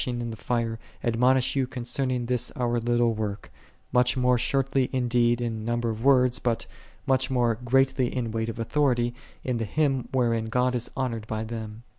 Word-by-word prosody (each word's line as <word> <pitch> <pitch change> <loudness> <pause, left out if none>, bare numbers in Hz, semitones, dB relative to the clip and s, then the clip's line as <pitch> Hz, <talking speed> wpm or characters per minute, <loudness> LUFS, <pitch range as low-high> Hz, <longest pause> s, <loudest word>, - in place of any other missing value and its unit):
ing 120 -1 -2
in 120 -1 -3
the - - -6
fire, 115 -1 -2 0.2
admonish 125 +3 +2
you 135 -2 +1
concerning 125 0 -2
this 125 -1 -1
our 120 -1 0
little 120 0 +2
work, 105 -2 -4 0.4
much 125 0 +3
more 125 0 +3
shortly 135 +1 +1
indeed 120 -2 +2
in 115 -2 -3
number 120 0 -1
of 110 +1 -6
words, 125 -2 +4
but 120 -2 -1 0.4
much 130 -1 +2
more 120 -3 +2
greatly 135 +1 +2
in 120 -4 -2
weight 115 0 -2
of 115 - -6
authority, 120 -1 +1 0.3
in 125 -2 -1
the 115 - -2
Hymn 135 0 0
wherein 115 -3 +1
God 125 +3 +1
is 125 -1 -1
honored 115 -5 -2
by 110 0 -3
them. 110 0 -7
120 Hz, 180 wpm, -26 LUFS, 115-130 Hz, 0.4 s, words